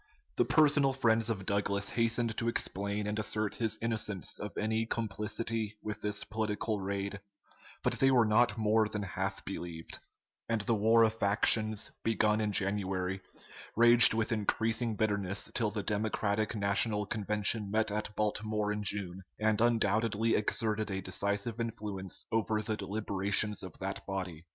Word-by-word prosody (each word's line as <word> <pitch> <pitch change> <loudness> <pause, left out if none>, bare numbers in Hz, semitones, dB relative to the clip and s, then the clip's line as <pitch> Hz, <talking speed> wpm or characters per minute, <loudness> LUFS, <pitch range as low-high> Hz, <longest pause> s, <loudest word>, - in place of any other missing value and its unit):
The - - +2
personal 145 -3 +4
friends 115 -3 +2
of 100 -4 -3
Douglas 100 0 0
hastened 115 -1 0
to 115 - -1
explain 100 -2 -2
and 105 +1 -2
assert 110 0 +1
his 110 -2 0
innocence 105 -5 -1
of - - -7
any 110 +1 -1
complicity 110 0 -3
with 105 -1 -5
this 105 0 0
political 110 0 -2
raid, 100 +1 -3 0.6
but - - 0
they 135 - +5
were 125 -3 +4
not 110 +1 +3
more 110 0 +2
than 105 -1 -4
half 95 +1 -4
believed; 85 -4 -6 0.5
and 115 -2 0
the 110 +3 0
war 110 +2 +4
of 110 0 0
factions, 110 +1 +3
begun 110 -1 +2
in 105 -1 0
January, 95 -1 -1 0.5
raged 120 0 +8
with 115 0 -1
increasing 110 +1 0
bitterness 100 -2 -1
till 115 -3 0
the 105 -1 -4
Democratic 110 0 -1
National 105 +1 +1
Convention 105 0 -1
met 110 +1 +1
at 105 0 -4
Baltimore 105 0 -1
in 105 0 -3
June, 95 -2 0 0.2
and 110 0 +1
undoubtedly 115 -1 +2
exerted 110 0 0
a 95 -1 -3
decisive 100 +4 -2
influence 105 -5 -4
over 110 -1 0
the 110 0 -2
deliberations 100 0 -1
of 90 -4 -9
that 95 +1 -5
body. 90 -4 -5
105 Hz, 150 wpm, -31 LUFS, 100-110 Hz, 0.6 s, raged